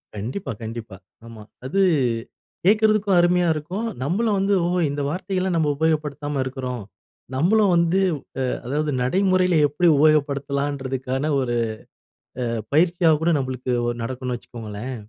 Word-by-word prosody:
கண்டிப்பா, 120 Hz, -, -4 dB
கண்டிப்பா. 110 Hz, -3 st, -7 dB, 0.3 s
ஆமா. 115 Hz, -2 st, -11 dB, 0.2 s
அது 195 Hz, +9 st, +1 dB, 0.8 s
கேக்குறதுக்கும் 215 Hz, -1 st, +4 dB
அருமையா 175 Hz, 0 st, +3 dB
இருக்கும். 175 Hz, +9 st, -4 dB, 0.2 s
நம்மளும் 200 Hz, -, +1 dB
வந்து 195 Hz, +1 st, +1 dB
ஓஹோ, 175 Hz, +1 st, 0 dB
இந்த 145 Hz, 0 st, -3 dB
வார்த்தைலாம் 185 Hz, +2 st, -2 dB
நம்ம 160 Hz, -2 st, +2 dB
உபயோகப்படுத்தாம 150 Hz, -2 st, -1 dB
இருக்குறோம். 130 Hz, -2 st, -4 dB, 0.5 s
நம்மளும் 195 Hz, +7 st, +3 dB
வந்து, 170 Hz, +2 st, +3 dB, 0.5 s
அ -, -, 0 dB, 0.2 s
அதாவது 150 Hz, +3 st, -1 dB
நடைமுறையில 185 Hz, +4 st, +2 dB
எப்டி 160 Hz, +5 st, +1 dB
உபயோகப்படுத்தலான்றதுக்கான 140 Hz, -2 st, 0 dB
ஒரு 120 Hz, -2 st, -1 dB, 0.9 s
அ -, -, -1 dB, 0.3 s
பயிற்சியா 170 Hz, +1 st, +4 dB
கூட 170 Hz, -, +3 dB
நம்ளுக்கு 130 Hz, -1 st, -3 dB, 0.2 s
ஒரு 120 Hz, -, -2 dB
நடக்குன்னு 125 Hz, +1 st, -3 dB
வச்சுக்கோங்களேன். 115 Hz, +2 st, -7 dB
150 Hz, 120 wpm, -23 LUFS, 130-180 Hz, 0.9 s, கேக்குறதுக்கும்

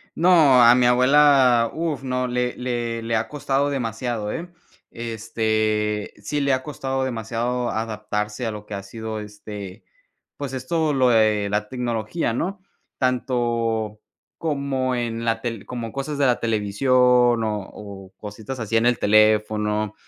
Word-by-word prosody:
No, 160 Hz, -7 st, +6 dB
a 120 Hz, +1 st, +8 dB
mi 125 Hz, -1 st, +3 dB
abuela, 125 Hz, -2 st, +5 dB
uf, 160 Hz, -3 st, -3 dB
no, 125 Hz, -1 st, -1 dB
le 125 Hz, 0 st, -1 dB
le 120 Hz, -2 st, -3 dB
-le 115 Hz, 0 st, -1 dB
ha 110 Hz, +1 st, 0 dB
costado 140 Hz, -1 st, -1 dB
demasiado, 115 Hz, -4 st, -3 dB
eh, 170 Hz, +2 st, -5 dB, 0.4 s
este, 110 Hz, -2 st, -1 dB
sí 145 Hz, +8 st, -2 dB
le 140 Hz, 0 st, +1 dB
ha 130 Hz, 0 st, -1 dB
costado 135 Hz, -2 st, -3 dB
demasiado 120 Hz, 0 st, -2 dB
adaptarse 105 Hz, +1 st, -3 dB
a 115 Hz, -, -1 dB
lo 105 Hz, -1 st, -8 dB
que 105 Hz, -, -9 dB
ha 100 Hz, -, -4 dB
sido, 110 Hz, +2 st, -6 dB
este, 105 Hz, -2 st, -9 dB, 0.5 s
pues, 140 Hz, -2 st, -6 dB
esto 150 Hz, +4 st, -1 dB
lo 130 Hz, -2 st, +3 dB
de 110 Hz, -3 st, +3 dB
la 105 Hz, 0 st, -1 dB
tecnología, 120 Hz, +2 st, -2 dB
¿no?, 185 Hz, -, -3 dB, 0.4 s
tanto 115 Hz, -4 st, -1 dB, 0.4 s
como 140 Hz, -4 st, -1 dB
en 115 Hz, -1 st, -3 dB
la 115 Hz, 0 st, 0 dB
tel 115 Hz, -4 st, -5 dB
como 120 Hz, -3 st, -5 dB
cosas 140 Hz, +3 st, -4 dB
de 140 Hz, -, +2 dB
la 125 Hz, -2 st, +2 dB
televisión, 110 Hz, +3 st, 0 dB, 0.5 s
o 105 Hz, -3 st, -3 dB
o 95 Hz, -2 st, -10 dB
cositas 105 Hz, +5 st, -7 dB
así 115 Hz, 0 st, 0 dB
en 115 Hz, -, +2 dB
el 120 Hz, -1 st, +3 dB
teléfono, 105 Hz, 0 st, +2 dB
115 Hz, 150 wpm, -23 LUFS, 110-130 Hz, 0.5 s, a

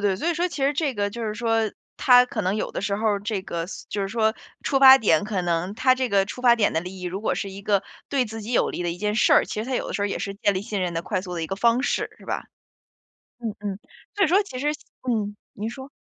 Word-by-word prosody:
对， 200 Hz, -2 st, +1 dB
所 325 Hz, -, -2 dB
以 345 Hz, -, +1 dB
说 350 Hz, +3 st, 0 dB
其 285 Hz, -, -5 dB
实 280 Hz, -, +3 dB
这 285 Hz, -3 st, -1 dB
个 205 Hz, 0 st, -1 dB
就 235 Hz, +2 st, -6 dB
是 210 Hz, -1 st, -2 dB
说， 225 Hz, -1 st, 0 dB, 0.2 s
他 250 Hz, -1 st, +6 dB
可 240 Hz, -3 st, -4 dB
能 185 Hz, +2 st, 0 dB
有 -, -, -2 dB
的 -, -, -4 dB
时 200 Hz, 0 st, -1 dB
候 210 Hz, -2 st, +1 dB
这 205 Hz, 0 st, -3 dB
个 170 Hz, -2 st, -4 dB
嘶 -, -, -9 dB
就 205 Hz, -, -3 dB
是 195 Hz, -, -2 dB
说 220 Hz, 0 st, +1 dB, 0.3 s
出 275 Hz, -, +1 dB
发 270 Hz, 0 st, +10 dB
点 200 Hz, -5 st, +3 dB
可 200 Hz, -4 st, -2 dB
能 175 Hz, +3 st, -1 dB
他 255 Hz, +1 st, +4 dB
这 255 Hz, -1 st, -1 dB
个 200 Hz, -2 st, +3 dB
出 225 Hz, -, -8 dB
发 240 Hz, -1 st, +7 dB
点 220 Hz, -3 st, +2 dB
的 160 Hz, -, +1 dB
利 185 Hz, +2 st, -8 dB
益， 180 Hz, -, -6 dB
如 185 Hz, +3 st, -3 dB
果 -, -, 0 dB
是 200 Hz, -, -4 dB
一 195 Hz, +1 st, -9 dB
个 200 Hz, -1 st, +2 dB, 0.3 s
对 270 Hz, -3 st, +1 dB
自 225 Hz, 0 st, -7 dB
己 230 Hz, -, -5 dB
有 -, -, +2 dB
利 175 Hz, -, -4 dB
的 175 Hz, -, -1 dB
一 170 Hz, -, -5 dB
件 210 Hz, 0 st, -1 dB
事 220 Hz, -, +4 dB
儿， -, -, +6 dB
其 -, -, -6 dB
实 -, -, -6 dB
他 260 Hz, -, -1 dB
有 -, -, -1 dB
的 -, -, -5 dB
时 200 Hz, -, -1 dB
候 205 Hz, -, +2 dB
也 200 Hz, -, -3 dB
是 200 Hz, 0 st, -4 dB
建 200 Hz, 0 st, +1 dB
立 185 Hz, -, -2 dB
信 210 Hz, -3 st, -3 dB
任 180 Hz, -1 st, -1 dB
的 165 Hz, -, -2 dB
快 185 Hz, 0 st, -2 dB
速 180 Hz, -2 st, -7 dB
的 165 Hz, -, -3 dB
一 -, -, -2 dB
个 195 Hz, -, -4 dB
方 235 Hz, +4 st, +3 dB
式， -, -, -1 dB
是 -, -, -16 dB
吧？ -, -, -3 dB, 1.0 s
嗯， 225 Hz, -3 st, -3 dB
嗯， 200 Hz, -2 st, -4 dB, 0.4 s
所 405 Hz, -2 st, +3 dB
以 -, -, +2 dB
说 390 Hz, +5 st, +4 dB
其 260 Hz, -10 st, -8 dB
实 290 Hz, +3 st, 0 dB, 0.4 s
嗯， 210 Hz, -3 st, -1 dB, 0.2 s
您 215 Hz, +2 st, -4 dB
说。 265 Hz, +2 st, -9 dB
210 Hz, 320 characters per minute, -24 LUFS, 195-245 Hz, 1.0 s, 发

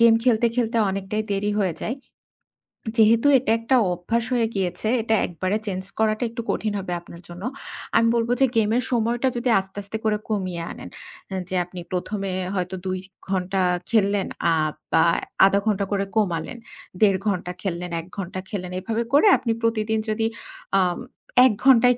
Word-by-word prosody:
Game 230 Hz, -1 st, +7 dB
খেলতে, 235 Hz, -2 st, +4 dB
খেলতে 235 Hz, -1 st, 0 dB
অনেকটাই 195 Hz, +2 st, -2 dB
দেরি 200 Hz, +1 st, 0 dB
হয়ে 180 Hz, -5 st, 0 dB
যায়। 245 Hz, -, -2 dB, 1.0 s
যেহেতু 225 Hz, +4 st, +5 dB
এটা 250 Hz, -3 st, 0 dB
একটা 230 Hz, +3 st, +2 dB, 0.2 s
অভ্যাস 225 Hz, +7 st, -1 dB
হয়ে 235 Hz, -2 st, +2 dB
গিয়েছে। 190 Hz, +3 st, -2 dB
এটা 225 Hz, 0 st, +1 dB
একবারে 185 Hz, +4 st, -1 dB
চেঞ্জ 190 Hz, -2 st, -3 dB, 0.2 s
করাটা 215 Hz, +1 st, +2 dB
একটু 235 Hz, +1 st, -5 dB
কঠিন 215 Hz, -1 st, -1 dB
হবে 185 Hz, -2 st, -5 dB
আপনার 170 Hz, 0 st, -13 dB
জন্য। 175 Hz, +3 st, -9 dB, 0.5 s
আমি 230 Hz, -, +4 dB
বলব 235 Hz, 0 st, 0 dB
যে -, -, +8 dB
গেমের 225 Hz, +3 st, +2 dB
সময়টা 240 Hz, +2 st, +1 dB
যদি 245 Hz, +1 st, 0 dB
আস্তে, 190 Hz, +1 st, -10 dB
আস্তে 200 Hz, +3 st, -5 dB
করে 210 Hz, -1 st, +2 dB
কমিয়ে 185 Hz, -5 st, -2 dB
আনেন। -, -, -9 dB, 0.6 s
যে 185 Hz, -, -2 dB
আপনি 180 Hz, 0 st, -9 dB
১ম 185 Hz, +3 st, -2 dB
এ -, -, -3 dB, 0.2 s
হয়তো 180 Hz, 0 st, -2 dB
২ 185 Hz, 0 st, -1 dB, 0.3 s
ঘণ্টা 190 Hz, 0 st, 0 dB, 0.3 s
খেললেন 200 Hz, -3 st, +2 dB, 0.2 s
আ -, -, +4 dB, 0.4 s
বা 160 Hz, -, +6 dB, 0.4 s
০.৫ 195 Hz, +1 st, +4 dB
ঘণ্টা 200 Hz, -2 st, +1 dB
করে 200 Hz, 0 st, +1 dB
কমালেন। 190 Hz, +1 st, 0 dB, 0.4 s
১.৫ 195 Hz, -3 st, +5 dB
ঘণ্টা 180 Hz, -3 st, -1 dB
খেললেন, 180 Hz, -2 st, -3 dB
১ 165 Hz, -, -9 dB
ঘণ্টা 185 Hz, -1 st, -4 dB
খেললেন 180 Hz, -4 st, -4 dB
এভাবে 225 Hz, +5 st, -2 dB
করে 290 Hz, +9 st, +6 dB
আপনি 235 Hz, -, -2 dB
প্রতিদিন 220 Hz, -1 st, +1 dB
যদি 220 Hz, +1 st, 0 dB, 0.5 s
আম 180 Hz, -2 st, +1 dB, 0.5 s
১ 260 Hz, -, +5 dB
ঘণ্টায় 250 Hz, -2 st, +6 dB
210 Hz, 165 wpm, -23 LUFS, 185-230 Hz, 1.0 s, যে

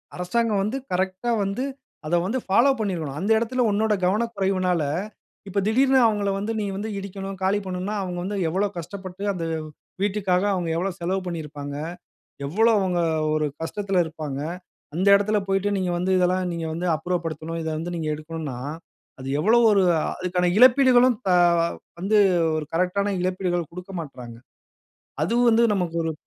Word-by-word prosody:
அரசாங்கம் 205 Hz, +3 st, 0 dB
வந்து 215 Hz, +7 st, -2 dB
கரெக்ட்டா 190 Hz, +5 st, -1 dB
வந்து, 200 Hz, +6 st, -2 dB, 0.4 s
அத 170 Hz, -, +1 dB
வந்து 235 Hz, +7 st, -1 dB
ஃபாலோ 235 Hz, +8 st, +4 dB
பண்ணியிருக்கணும். 165 Hz, -9 st, -3 dB
அந்த 205 Hz, +4 st, 0 dB
இடத்தில 245 Hz, +3 st, 0 dB
உன்னோட 215 Hz, +1 st, +2 dB
கவனக்குறைவுனால, 190 Hz, -5 st, +1 dB, 0.6 s
இப்ப 200 Hz, +1 st, -1 dB
திடீர்ன்னு 265 Hz, +4 st, +4 dB
அவுங்கள 205 Hz, -2 st, +1 dB
வந்து 205 Hz, +3 st, -2 dB
நீ 210 Hz, -, -1 dB, 0.3 s
இடிக்கணும். 195 Hz, 0 st, -6 dB
காலி 200 Hz, +2 st, +2 dB
பண்ணனும்ன்னா 185 Hz, +3 st, -3 dB
அவுங்க 180 Hz, -2 st, -4 dB
வந்து 200 Hz, +1 st, -3 dB
எவ்வளோ 195 Hz, +5 st, +1 dB
கஷ்டப்பட்டு 185 Hz, +2 st, -7 dB
அந்த 170 Hz, -2 st, -4 dB, 0.6 s
வீட்டுக்காக 195 Hz, -2 st, +1 dB
அவுங்க 175 Hz, -3 st, -2 dB
எவ்வளோ 185 Hz, +4 st, -1 dB
செலவு 185 Hz, +3 st, -1 dB
பண்ணியிருப்பாங்க? 150 Hz, -4 st, -5 dB, 0.7 s
எவ்வளோ 220 Hz, +10 st, +3 dB
அவுங்க 185 Hz, -3 st, 0 dB, 0.3 s
ஒரு 155 Hz, -1 st, +1 dB
கஷ்டத்துல 195 Hz, +1 st, 0 dB
இருப்பாங்க? 155 Hz, -4 st, -5 dB, 0.6 s
அந்த 190 Hz, +3 st, 0 dB
இடத்தில 210 Hz, +1 st, +2 dB
போய்ட்டு 195 Hz, +1 st, +1 dB
"நீங்க 185 Hz, -2 st, -1 dB
வந்து 185 Hz, +2 st, 0 dB
இதெல்லா 180 Hz, +1 st, +2 dB, 0.2 s
நீங்க 165 Hz, -1 st, -4 dB
வந்து 175 Hz, +2 st, -2 dB
அப்புறப்படுத்தணும். 165 Hz, -1 st, -3 dB
இத 160 Hz, -, -2 dB
வந்து 175 Hz, +2 st, -4 dB
நீங்க 155 Hz, -1 st, -2 dB
எடுக்கணும்ன்னா" 155 Hz, -4 st, -6 dB, 0.6 s
அது 130 Hz, -, -7 dB
எவ்வளோ 220 Hz, +9 st, +4 dB
ஒரு 200 Hz, -2 st, +4 dB, 0.4 s
அதுக்கான 180 Hz, -1 st, 0 dB
இழப்பீடுகளும் 255 Hz, -1 st, +6 dB
க -, -, +2 dB, 0.7 s
வந்து 205 Hz, +3 st, +2 dB, 0.4 s
ஒரு 155 Hz, -, -3 dB
கரெக்ட்டான 200 Hz, +3 st, +1 dB
இழப்பீடுகள் 180 Hz, -3 st, -1 dB
கொடுக்கமாட்றாங்க. 165 Hz, -, -8 dB, 0.9 s
அதுவும் 235 Hz, +7 st, +2 dB
வந்து 230 Hz, +1 st, +4 dB
நமக்கு 175 Hz, -3 st, -2 dB
ஒரு 160 Hz, -, -1 dB
185 Hz, 145 wpm, -24 LUFS, 170-205 Hz, 0.9 s, இழப்பீடுகளும்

